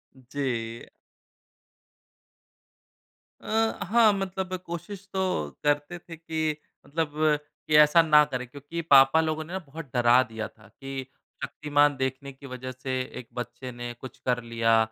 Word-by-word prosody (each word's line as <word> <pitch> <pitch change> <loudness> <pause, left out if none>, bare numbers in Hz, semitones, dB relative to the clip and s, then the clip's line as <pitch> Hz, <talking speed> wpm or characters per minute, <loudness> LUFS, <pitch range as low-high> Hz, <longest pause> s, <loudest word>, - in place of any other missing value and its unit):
जी। 125 -3 -4 2.5
अ, 225 +1 0
हाँ 225 +1 +6
मतलब 190 -1 -3
कोशिश 175 +4 -7
तो 190 - 0 0.4
करते 145 +3 +1
थे 165 -1 -10
कि 160 -1 -2 0.3
मतलब 155 +1 -1 0.6
कि 155 - +2
ऐसा 150 +2 +7
ना 150 -2 +6
करें। 125 -3 -4
क्योंकि 145 +6 -6
पापा 140 0 +6
लोगों 155 0 -1
ने 180 +4 -5
बहुत 160 -1 -9
डरा 120 0 +5
दिया 110 -2 -5
था 110 -2 -20
कि 135 +5 -7 0.4
शक्तिमान 145 -1 +2
देखने 130 +1 -3
की 135 +1 -14
वज़ह 130 0 -6
से 130 +1 -3 0.2
एक 125 - -10
बच्चे 120 +1 -6
ने 120 0 -6
कुछ 125 +2 -11
कर 125 -1 +1
लिया। 115 -1 +2
140 Hz, 135 wpm, -27 LUFS, 125-165 Hz, 2.5 s, ऐसा